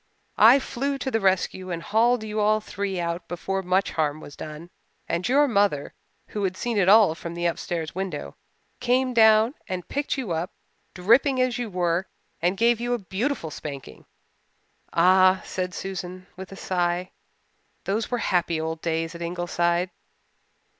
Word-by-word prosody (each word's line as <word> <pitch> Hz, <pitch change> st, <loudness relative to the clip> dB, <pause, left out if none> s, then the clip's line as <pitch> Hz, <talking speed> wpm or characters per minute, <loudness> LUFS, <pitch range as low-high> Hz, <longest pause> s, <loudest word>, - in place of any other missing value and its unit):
I 230 Hz, +5 st, +9 dB
flew 275 Hz, +1 st, -2 dB
to 265 Hz, -1 st, -3 dB
the 225 Hz, -, +1 dB
rescue 185 Hz, -1 st, 0 dB
and 170 Hz, -1 st, -4 dB
hauled 230 Hz, +3 st, +2 dB
you 215 Hz, 0 st, -3 dB
all 215 Hz, +1 st, +3 dB
three 200 Hz, -3 st, -4 dB
out 170 Hz, 0 st, -3 dB
before 190 Hz, +2 st, -3 dB
much 185 Hz, +1 st, +1 dB
harm 155 Hz, -1 st, -1 dB
was 145 Hz, -, -11 dB
done, 155 Hz, +3 st, -9 dB, 0.4 s
and 170 Hz, +6 st, -1 dB
your 285 Hz, +3 st, +4 dB
mother, 200 Hz, -, +1 dB, 0.4 s
who 210 Hz, -, -3 dB
had 185 Hz, -1 st, -1 dB
seen 235 Hz, -1 st, -1 dB
it 185 Hz, -1 st, +3 dB
all 210 Hz, -5 st, +7 dB
from 170 Hz, +1 st, -7 dB
the 175 Hz, 0 st, -3 dB
upstairs 170 Hz, -1 st, -2 dB
window, 180 Hz, -, -5 dB, 0.4 s
came 255 Hz, +1 st, +1 dB
down 220 Hz, +1 st, +5 dB
and 180 Hz, -1 st, -4 dB
picked 285 Hz, 0 st, -2 dB
you 245 Hz, -9 st, -3 dB
up, 165 Hz, +4 st, -2 dB, 0.4 s
dripping 245 Hz, +9 st, +3 dB
as 255 Hz, -1 st, +1 dB
you 240 Hz, -2 st, -3 dB
were, 180 Hz, -1 st, 0 dB, 0.3 s
and 180 Hz, +3 st, +1 dB
gave 235 Hz, +1 st, +3 dB
you 240 Hz, 0 st, 0 dB
a -, -, -2 dB
beautiful 200 Hz, -, -3 dB
spanking. 140 Hz, -, -8 dB, 0.8 s
Ah," 185 Hz, +2 st, +5 dB
said 180 Hz, -1 st, -3 dB
Susan 185 Hz, -1 st, -6 dB
with 190 Hz, +1 st, -9 dB
a -, -, -8 dB
sigh, 180 Hz, -1 st, -1 dB, 0.7 s
"those 210 Hz, +3 st, -1 dB
were 245 Hz, -, 0 dB
happy 175 Hz, -6 st, 0 dB
old 160 Hz, 0 st, -3 dB
days 165 Hz, 0 st, -2 dB
at 170 Hz, -, -9 dB
Ingleside." 175 Hz, +1 st, -1 dB
185 Hz, 165 wpm, -25 LUFS, 170-220 Hz, 0.8 s, I